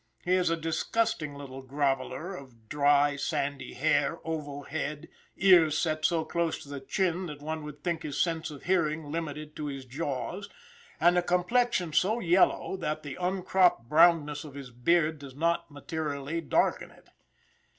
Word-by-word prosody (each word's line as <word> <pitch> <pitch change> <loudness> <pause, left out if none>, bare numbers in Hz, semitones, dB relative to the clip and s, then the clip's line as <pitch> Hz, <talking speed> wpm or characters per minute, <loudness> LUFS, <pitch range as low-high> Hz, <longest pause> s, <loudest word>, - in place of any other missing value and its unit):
He 180 - +2
is 185 -2 +3
a 165 - +1
disgusting 165 0 -1
little 135 -2 -8
groveler 135 +6 -2
of 120 -7 -13
dry, 145 0 +3
sandy 140 0 -3
hair, - - +2
oval 145 -3 -4
head, 150 +2 -4 0.3
ears 175 -5 +6
set 155 -2 0
so 165 -2 +2
close 170 -1 -1
to 140 - -14
the 140 -1 -5
chin 180 +5 -1
that 150 -2 -8
one 155 0 -4
would 150 -1 -9
think 170 -2 -1
his 145 -2 -4
sense 165 -2 0
of 145 -3 -10
hearing 155 -5 0
limited 155 -2 -5
to 150 - -3
his 135 -2 -6
jaws, 145 +8 -4 0.5
and 175 +1 +5
a - - +1
complexion 180 0 +1
so 215 +9 +2
yellow 185 0 +3
that 155 -4 -3
the 145 -3 -6
uncropped 180 -7 +2
brownness 155 -2 +4
of 145 -3 -11
his 135 -3 -8
beard 155 +5 +2
does 140 -2 -10
not 170 +3 0
materially 145 +1 -4
darken 155 - +1
it. - - -21
155 Hz, 160 wpm, -29 LUFS, 145-175 Hz, 0.5 s, ears